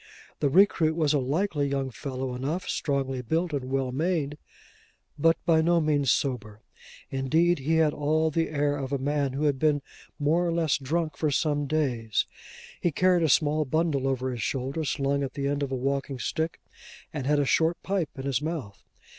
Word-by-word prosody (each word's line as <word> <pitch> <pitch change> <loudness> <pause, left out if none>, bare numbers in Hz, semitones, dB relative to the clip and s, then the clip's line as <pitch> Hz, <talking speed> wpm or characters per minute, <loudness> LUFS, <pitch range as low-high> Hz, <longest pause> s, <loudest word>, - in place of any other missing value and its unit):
The 145 - +2
recruit 165 -2 +4
was 155 -3 +2
a 145 - +3
likely 145 +2 0
young 135 -1 -2
fellow 130 0 -4
enough, 145 +9 -3
strongly 135 -3 -1
built 160 +7 -1
and 135 -3 -2
well 135 -1 0
made, 150 0 -1 0.8
but 165 +2 +4
by 160 -2 +4
no 170 +1 +3
means 145 -4 +1
sober: 110 -7 -1 0.5
indeed 160 +6 +2
he 155 +5 0
had 160 -2 +3
all 155 +2 +1
the 165 +1 0
air 145 -1 0
of 135 -1 -4
a 140 - +1
man 140 0 -1
who 140 +3 -2
had 145 -3 +1
been 150 -2 +2 0.3
more 155 +4 +2
or 175 - 0
less 165 -3 +1
drunk 155 +4 -2
for 155 - +1
some 145 +1 0
days. 125 -8 0 0.6
He 175 - +2
carried 180 +3 +3
a 160 - +2
small 150 +2 +3
bundle 150 -2 0
over 130 -1 -1
his 120 -2 -5
shoulder, 135 +6 -2
slung 140 0 0
at 135 -1 -4
the 140 -2 -2
end 145 0 -1
of 140 -1 -2
a - - 0
walking 135 +1 -2
stick, 160 +6 -2 0.5
and 140 -4 -3
had 150 0 +3
a 145 - +2
short 165 +5 +2
pipe 190 -5 -1
in 135 - -5
his 135 -1 0
mouth. 150 -11 -5
145 Hz, 190 wpm, -27 LUFS, 135-160 Hz, 0.8 s, recruit